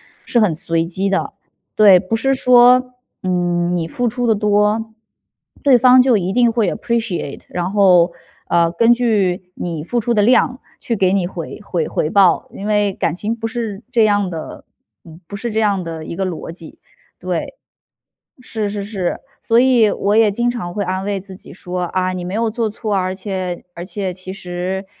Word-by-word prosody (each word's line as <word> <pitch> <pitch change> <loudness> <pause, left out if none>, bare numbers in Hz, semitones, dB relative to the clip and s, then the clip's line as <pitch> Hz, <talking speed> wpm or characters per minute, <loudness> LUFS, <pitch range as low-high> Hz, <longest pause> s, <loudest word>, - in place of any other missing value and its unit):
的。 - - -27 1.7
对， 200 -4 +7
不 190 +5 -2
是 270 +4 +1
说， 250 0 +5 0.3
嗯， 175 -1 0
你 165 -1 -2
付 245 +8 -2
出 245 +2 -2
得 225 - +3
多， 210 +1 +1 0.7
对 275 -3 +6
方 255 +1 +6
就 250 -3 +3
一 190 -1 -2
定 240 0 +3
会 225 -2 +1
有 - - -1
appreciate。 220 - -3
然 180 +1 -3
后， 185 -4 +4 0.4
呃， 170 -1 +3
根 230 +7 +4
据 195 -7 0
你 165 -4 -4
付 240 +8 -1
出 235 +1 0
的 210 - +3
量， 250 +3 +3 0.2
去 235 - -2
给 190 -3 +2
你 195 -3 +1
回 175 +3 -7
回 175 -5 -2
回 155 - -1
报。 195 -2 +3
因 200 - -6
为 205 -2 +1
感 165 -2 -2
情 210 +4 -2
不 225 -1 -4
是 225 -2 -5
这 235 -3 +3
样 205 -2 +2
的， 165 -3 -8 0.4
嗯， 165 +2 -14
不 200 - -8
是 235 +4 -4
这 220 - 0
样 200 -4 +1
的 165 -1 -7
一 170 - -6
个 195 - -2
逻 170 -2 -5
辑， 165 -2 -13 0.4
对， - - -4 0.8
是 220 -4 -4
是 200 0 -4
是， 195 -4 -3 0.2
所 230 0 +2
以 245 -4 +4
我 205 +2 0
也 225 -1 +5
经 240 +4 0
常 175 -8 -5
会 205 +1 -2
安 185 +1 -3
慰 200 -1 -2
自 190 -1 -12
己 190 - -14
说： 180 0 -4
“啊， 185 0 +1
你 180 -1 -5
没 180 - -5
有 225 +1 0
做 230 -1 -1
错， 210 -1 -3
而 185 0 -1
且 185 -3 -4
而 175 - -7
且 190 -1 -4
其 185 +1 -8
实 185 +1 -4
200 Hz, 220 characters per minute, -18 LUFS, 180-225 Hz, 1.7 s, 对